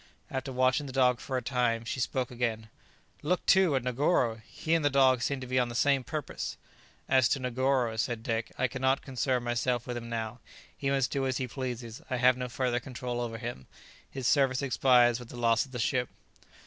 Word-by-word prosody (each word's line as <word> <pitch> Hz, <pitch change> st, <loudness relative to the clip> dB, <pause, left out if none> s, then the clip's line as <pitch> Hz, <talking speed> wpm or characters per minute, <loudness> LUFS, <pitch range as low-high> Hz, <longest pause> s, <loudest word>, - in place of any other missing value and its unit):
After 130 Hz, 0 st, -3 dB
watching 130 Hz, +3 st, +2 dB
the -, -, -6 dB
dog 125 Hz, -2 st, +3 dB
for 130 Hz, -, -3 dB
a 125 Hz, -, -3 dB
time, 120 Hz, -3 st, 0 dB
she 125 Hz, -, -3 dB
spoke 125 Hz, 0 st, -1 dB
again: 115 Hz, -3 st, -2 dB, 0.5 s
"Look, 180 Hz, +4 st, 0 dB
too, 190 Hz, -6 st, +5 dB
at 130 Hz, -, 0 dB
Negoro! 125 Hz, -3 st, +1 dB
he 160 Hz, -, -2 dB
and 165 Hz, -2 st, +2 dB
the 145 Hz, -, +4 dB
dog 130 Hz, -2 st, +4 dB
seem 140 Hz, +2 st, -1 dB
to -, -, -5 dB
be 130 Hz, +1 st, +1 dB
on 120 Hz, -1 st, +1 dB
the 120 Hz, -, -7 dB
same 135 Hz, +1 st, +3 dB
purpose!" 150 Hz, +2 st, -5 dB, 0.5 s
"As 130 Hz, -2 st, +4 dB
to 135 Hz, -, +1 dB
Negoro," 125 Hz, -2 st, 0 dB
said 110 Hz, +1 st, -2 dB
Dick, 115 Hz, -1 st, -2 dB
"I 130 Hz, -, +2 dB
cannot 130 Hz, +2 st, 0 dB
concern 130 Hz, -2 st, -1 dB
myself 120 Hz, 0 st, 0 dB
with 125 Hz, -, -4 dB
him 115 Hz, -1 st, -6 dB
now; 115 Hz, +1 st, -4 dB, 0.4 s
he 140 Hz, -, -2 dB
must 135 Hz, -2 st, +1 dB
do 135 Hz, -1 st, 0 dB
as 130 Hz, -, -1 dB
he 130 Hz, -, -2 dB
pleases; 120 Hz, -2 st, -5 dB
I 130 Hz, -, 0 dB
have 125 Hz, 0 st, +4 dB
no 125 Hz, 0 st, -4 dB
further 125 Hz, -1 st, 0 dB
control 125 Hz, -1 st, -5 dB
over 115 Hz, -1 st, -4 dB
him; 120 Hz, -, -6 dB, 0.4 s
his 135 Hz, -2 st, -6 dB
service 135 Hz, 0 st, +3 dB
expires 125 Hz, -3 st, +4 dB
with 120 Hz, -1 st, -11 dB
the -, -, -9 dB
loss 115 Hz, +2 st, +2 dB
of -, -, -19 dB
the 125 Hz, -, -5 dB
ship." 125 Hz, +1 st, 0 dB
125 Hz, 210 wpm, -29 LUFS, 120-135 Hz, 0.5 s, too